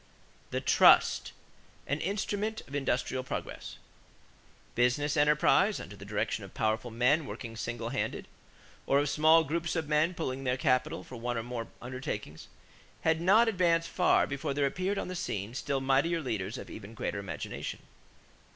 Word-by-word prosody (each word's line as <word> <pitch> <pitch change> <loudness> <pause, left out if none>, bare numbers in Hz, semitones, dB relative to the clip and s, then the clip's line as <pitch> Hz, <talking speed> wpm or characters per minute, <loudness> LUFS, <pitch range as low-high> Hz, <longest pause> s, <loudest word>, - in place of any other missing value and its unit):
=The - - -2
Trust - - +5 0.5
an 145 +2 -1
Instrument 205 +4 -2
of 140 - -15
Industrial 130 -2 -1
Progress.= - - -6 1.0
Business 125 +5 +1
enterprise, 150 +7 +4
under 100 - -9
the 100 0 -11
direction 105 +1 -2
of 95 - -12
powerful 110 +2 0
men 125 +7 +2
working 115 -2 -7
single 115 0 -4
handed, 130 - -3 0.6
or 140 - +4
of 145 0 +2
small 160 +2 +5
groups 170 +4 -2
of 160 -3 -1
men 155 +4 +2
pooling 135 -5 -3
their 125 -1 0
capital 130 - +1
for 125 - -10
one 120 +1 -2
or 115 - -2
more 120 -1 -5 0.2
undertakings, 120 - -6 0.5
had 160 0 +2
not 210 +7 +5
advanced 170 -5 +2
far 180 - +3
before 140 0 -3
there 145 -1 +2
appeared 185 +8 -1
upon - - -2
the 185 - -5
scene 105 - -3
still 135 +1 -1
mightier 135 +6 +2
leaders 110 -8 -3
of - - -8
even 110 +2 -9
greater 110 -4 -3
imagination. 100 - -5
135 Hz, 160 wpm, -30 LUFS, 115-165 Hz, 1.0 s, Trust